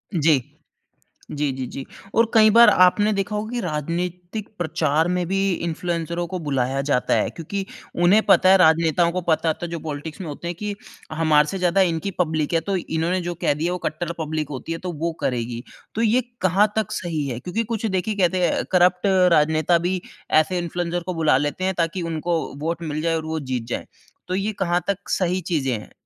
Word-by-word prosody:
जी। 155 -4 +3 0.9
जी, 145 -1 -1
जी, 130 -1 -4
जी। 135 - -7 0.3
और 230 0 +3
कई 215 -1 +7
बार 235 +1 +8
आपने 205 +3 +4
देखा 200 +1 -2
होगा 215 +1 -3
कि 245 0 -2
राजनीतिक 175 +4 -4
प्रचार 160 -1 +1
में 180 0 0
भी 195 +1 0 0.3
इन्फ्लुएंसरों 170 0 -2
को 185 - -4
बुलाया 135 -4 -1
जाता 125 -3 +2
है - - +1
क्योंकि 195 +4 -5 0.4
उन्हें 200 +5 +6
पता 185 - +5
है, 190 - +8
राजनेताओं 165 0 +4
को 185 - -1
पता 160 0 +2
होता 160 - -2
है - - -9
जो 170 - -3
पॉलिटिक्स 155 +1 -6
में 180 - -5
होते 150 +4 -6
हैं 175 - -3
कि 210 +2 -4 0.4
हमारे 155 -2 +3
से 190 - -3
ज़्यादा 180 +1 +2
इनकी 180 +1 +1
पब्लिक 155 -3 0
है 165 - +3
तो 200 -1 0
इन्होंने 170 +1 -1
जो 175 0 -4
कह 160 -3 0
दिया 165 +4 -1
वो 180 - -2
कट्टर 170 +2 -3
पब्लिक 155 -2 -3
होती 145 +4 -5
है 165 - -3
तो 180 0 -5
वो 165 +2 -2
करेगी। 120 -1 -2 0.3
तो 225 - -1
ये 230 +3 +3 0.2
कहाँ 190 +3 +3
तक 215 -1 -1
सही 165 -8 -2
है 120 -3 -4
क्योंकि 210 - -2
कुछ 225 0 -3
देखिए 200 +1 -1
कहते 185 -2 +2
हैं - - 0
करप्ट 180 +1 +4 0.3
राजनेता 155 +2 +3
भी 185 0 0 0.4
ऐसे 180 +3 -1
इन्फ्लुएंसर 175 0 -2
को 185 - -2
बुला 155 -4 +3
लेते 145 +5 -2
हैं 190 0 0
ताकि 170 +2 0
उनको 165 +2 -1 0.2
वोट 165 +2 -2
मिल 155 -2 -3
जाए 165 0 +1
और 160 - -3
वो 160 0 -2
जीत 130 -4 -3
जाए। - - -4 0.4
तो 185 - -1
ये 200 +3 -1
कहाँ 175 -2 +1
तक 200 0 -2
सही 185 0 +1
चीज़ें 155 -7 -1
हैं? 105 - -13
170 Hz, 205 wpm, -22 LUFS, 155-185 Hz, 0.9 s, बार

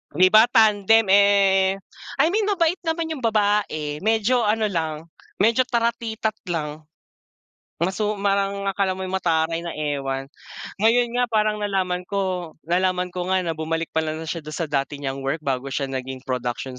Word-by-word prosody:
'Di 185 +3 +6
ba, 215 +2 +7
tandem. 220 0 +4
Eh, 195 -1 +4 0.5
I - - +5
mean, 420 +1 +1
mabait 355 -4 +1
naman 325 0 -1
'yong 310 - -4
babae, 205 -9 0
medyo 220 +5 +2
ano 220 +1 +1
lang, 160 -2 -2 0.3
medyo 230 +5 +2
taratitat 230 -3 -1
lang. 155 -3 -4 1.0
Masu 205 +4 0
parang 200 0 0
akala 195 -1 0
mo'y 185 0 -5
mataray 165 -3 0
na 170 0 -6
ewan. 135 -2 -3 0.5
Ngayon 235 +3 +3
nga 245 - +3
parang 215 -2 +1
nalaman 185 -3 -1
ko, 185 -4 -3
nalaman 180 +1 0
ko 180 0 -4
nga, 185 0 +1
na 165 -3 -3
bumalik 165 +1 -2
pala 160 -1 -1
na 160 - -6
siya 165 +1 -4
do'n 155 -1 -8
sa 165 -2 -3
dati 140 0 -2
niyang 135 -1 -3
work 135 +4 -3
bago 135 -2 -2
siya 135 0 -3
naging 130 0 -5
production 125 0 -4
185 Hz, 160 wpm, -23 LUFS, 155-215 Hz, 1.0 s, ba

